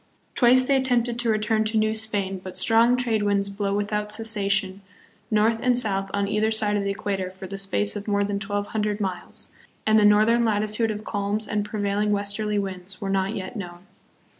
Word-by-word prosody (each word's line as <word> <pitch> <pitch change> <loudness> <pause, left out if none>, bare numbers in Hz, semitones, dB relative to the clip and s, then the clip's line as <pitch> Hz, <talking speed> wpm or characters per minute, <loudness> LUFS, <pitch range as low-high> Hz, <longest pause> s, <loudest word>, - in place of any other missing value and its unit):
Twice 255 +1 +5
they 275 +2 +2
attempted 245 -2 +1
to 240 -1 +1
return 215 0 +1
to 220 +1 0
New 215 0 +2
Spain, 200 -4 -2
but 185 - -7
strong 235 +2 +4
trade 235 -4 0
winds 200 -1 +1
blow 200 0 -2
without 210 0 -2
cessation 200 -3 0 0.5
north 220 +1 +2
and 250 -1 +2
south 195 -5 0
on 200 0 -1
either 215 +2 +1
side 215 -1 0
of 205 - 0
the 200 - -1
equator 195 -2 -3
for 190 +1 -10
the 195 +1 -6
space 150 - -1
of 205 - -6
more 205 -1 +1
than 200 0 -2
twelve 205 0 -3
hundred 210 -1 -1
miles, 190 -3 -5 0.3
and 220 0 +5
the - - +3
northern 215 +3 +5
latitude 215 +1 0
of 215 0 -4
calms 205 +1 -2
and 210 -1 -1
prevailing 210 0 -1
westerly 205 +1 -1
winds 190 -1 -5
were 195 -1 -3
not 195 +2 0
yet 190 +4 -6
known. 175 -3 -8
210 Hz, 195 wpm, -24 LUFS, 200-220 Hz, 0.5 s, Twice